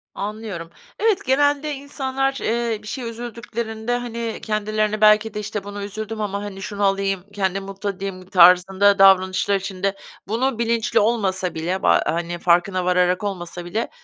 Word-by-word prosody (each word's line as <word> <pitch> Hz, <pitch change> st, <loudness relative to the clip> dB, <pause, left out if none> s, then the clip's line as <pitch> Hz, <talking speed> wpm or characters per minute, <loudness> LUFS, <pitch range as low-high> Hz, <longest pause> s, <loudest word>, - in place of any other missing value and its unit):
Anlıyorum. 205 Hz, -5 st, -5 dB, 0.3 s
Evet 435 Hz, -3 st, +1 dB
genelde 285 Hz, +2 st, +2 dB
insanlar, 270 Hz, -1 st, -2 dB
eee, 230 Hz, -1 st, -1 dB
bir -, -, -11 dB
şeye 245 Hz, +2 st, -4 dB
üzüldüklerinde, 235 Hz, 0 st, -4 dB
hani, 235 Hz, -2 st, -4 dB
kendilerine 215 Hz, 0 st, -1 dB
belki 215 Hz, 0 st, +5 dB
de, 210 Hz, -, -4 dB
"İşte 210 Hz, -1 st, -4 dB
buna 205 Hz, 0 st, -6 dB
üzüldüm 215 Hz, +2 st, -5 dB
ama 200 Hz, -1 st, -2 dB
hani 195 Hz, -2 st, -7 dB
şunu 205 Hz, +1 st, -4 dB
alayım, 195 Hz, -1 st, 0 dB
kendimi 195 Hz, -1 st, -1 dB
mutlu 195 Hz, +1 st, -5 dB
edeyim." 190 Hz, -1 st, -6 dB
tarzında 190 Hz, +3 st, +5 dB
davranışlar 190 Hz, +1 st, +5 dB
içinde 195 Hz, 0 st, -2 dB, 0.3 s
bunu 235 Hz, +3 st, -1 dB
bilinçli 235 Hz, 0 st, +1 dB
olmasa 195 Hz, -5 st, 0 dB
bile, 175 Hz, +4 st, -2 dB
ba 85 Hz, -, +4 dB
hani 170 Hz, +2 st, -2 dB
farkına 180 Hz, +2 st, +2 dB
vararak 180 Hz, +1 st, +2 dB
olmasa 175 Hz, -3 st, -5 dB
bile, 215 Hz, +7 st, -2 dB
205 Hz, 150 wpm, -22 LUFS, 190-230 Hz, 0.3 s, belki